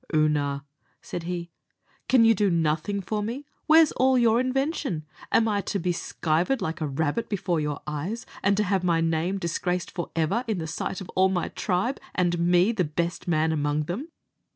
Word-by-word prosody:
"Oonagh," 145 Hz, -2 st, +1 dB, 0.4 s
said 175 Hz, -, -5 dB
he, 170 Hz, -1 st, -4 dB, 0.6 s
"can 250 Hz, -3 st, +6 dB
you 225 Hz, -, +7 dB
do 205 Hz, -2 st, +2 dB
nothing 165 Hz, +4 st, 0 dB
for 210 Hz, +3 st, -2 dB
me? 240 Hz, +7 st, -4 dB, 0.2 s
Where's 315 Hz, 0 st, +7 dB
all 260 Hz, 0 st, +3 dB
your 235 Hz, -1 st, +4 dB
invention? 255 Hz, -, -1 dB, 0.3 s
Am 225 Hz, -, +4 dB
I 205 Hz, -2 st, +1 dB
to 200 Hz, -, -2 dB
be 180 Hz, -1 st, 0 dB
skivered 170 Hz, +7 st, 0 dB
like 160 Hz, +2 st, -3 dB
a 155 Hz, -, 0 dB
rabbit 150 Hz, +10 st, -1 dB
before 180 Hz, -5 st, 0 dB
your 150 Hz, -1 st, -2 dB
eyes, 160 Hz, +10 st, -4 dB, 0.2 s
and 200 Hz, 0 st, +2 dB
to 210 Hz, -, +3 dB
have 195 Hz, -2 st, 0 dB
my 170 Hz, -2 st, +2 dB
name 165 Hz, +3 st, 0 dB
disgraced 180 Hz, 0 st, -2 dB
forever 175 Hz, +5 st, -1 dB
in 220 Hz, -3 st, 0 dB
the 165 Hz, -, -3 dB
sight 165 Hz, +4 st, -4 dB
of 185 Hz, -, -8 dB
all 190 Hz, +1 st, +3 dB
my 180 Hz, -2 st, -1 dB
tribe, 210 Hz, +8 st, -1 dB, 0.2 s
and 175 Hz, -2 st, +1 dB
me 175 Hz, +4 st, +4 dB
the 215 Hz, -6 st, 0 dB
best 170 Hz, +3 st, -3 dB
man 160 Hz, -1 st, +2 dB
among 145 Hz, -1 st, 0 dB
them? 195 Hz, -, -4 dB
180 Hz, 185 wpm, -26 LUFS, 160-215 Hz, 0.6 s, you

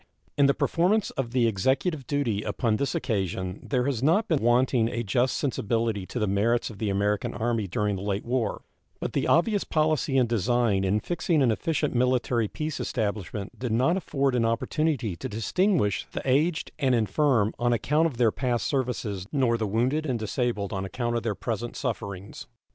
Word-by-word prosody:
In 140 Hz, -1 st, +4 dB
the 140 Hz, -, +3 dB
performance 185 Hz, +5 st, +1 dB
of 135 Hz, -3 st, -3 dB
the 125 Hz, -1 st, +2 dB
Executive 130 Hz, -, 0 dB
duty 125 Hz, -8 st, 0 dB
upon 110 Hz, -1 st, 0 dB
this 140 Hz, +1 st, -1 dB
occasion 95 Hz, -2 st, -2 dB
there 125 Hz, -3 st, -1 dB
has 135 Hz, -5 st, -1 dB
not 170 Hz, +11 st, +3 dB
been 160 Hz, -6 st, +1 dB
wanting 120 Hz, 0 st, +3 dB
a 120 Hz, 0 st, -3 dB
just 120 Hz, +5 st, +1 dB
sensibility 115 Hz, -6 st, -1 dB
to -, -, -6 dB
the 110 Hz, -, +1 dB
merits 110 Hz, +5 st, +1 dB
of 100 Hz, -, -12 dB
the 110 Hz, -, -1 dB
American 105 Hz, +4 st, 0 dB
Army 115 Hz, -3 st, -1 dB
during 105 Hz, +2 st, -1 dB
the -, -, -6 dB
late 100 Hz, 0 st, -2 dB
war; 120 Hz, -3 st, -1 dB, 0.4 s
but -, -, -4 dB
the -, -, 0 dB
obvious 205 Hz, +4 st, +3 dB
policy 155 Hz, -3 st, +1 dB
and 125 Hz, -2 st, +4 dB
design 115 Hz, -2 st, +1 dB
in 100 Hz, +3 st, +1 dB
fixing 170 Hz, -, +1 dB
an 120 Hz, -, +4 dB
efficient 150 Hz, +5 st, -1 dB
military 125 Hz, -2 st, +1 dB
peace 155 Hz, +6 st, -4 dB
establishment 105 Hz, -1 st, -3 dB
did 125 Hz, -2 st, -2 dB
not 130 Hz, +10 st, +3 dB
afford 140 Hz, -7 st, 0 dB
an 120 Hz, -2 st, +2 dB
opportunity 115 Hz, -, 0 dB
to -, -, -6 dB
distinguish 115 Hz, -, +1 dB
the -, -, -4 dB
aged 155 Hz, +6 st, +1 dB
and 130 Hz, -4 st, +3 dB
infirm 115 Hz, 0 st, +2 dB
on 120 Hz, 0 st, +2 dB
account 150 Hz, +7 st, +2 dB
of 140 Hz, -7 st, -7 dB
their 115 Hz, -2 st, +4 dB
past 125 Hz, -1 st, -1 dB
services 120 Hz, -8 st, -2 dB
nor 130 Hz, -5 st, +2 dB
the 110 Hz, -2 st, -1 dB
wounded 130 Hz, +9 st, 0 dB
and 125 Hz, -3 st, 0 dB
disabled 110 Hz, -2 st, -2 dB
on 95 Hz, -1 st, -2 dB
account 120 Hz, +4 st, -2 dB
of 115 Hz, -, 0 dB
their 110 Hz, -3 st, -2 dB
present 115 Hz, +2 st, -4 dB
sufferings. 100 Hz, -2 st, -5 dB
120 Hz, 185 wpm, -26 LUFS, 105-140 Hz, 0.4 s, In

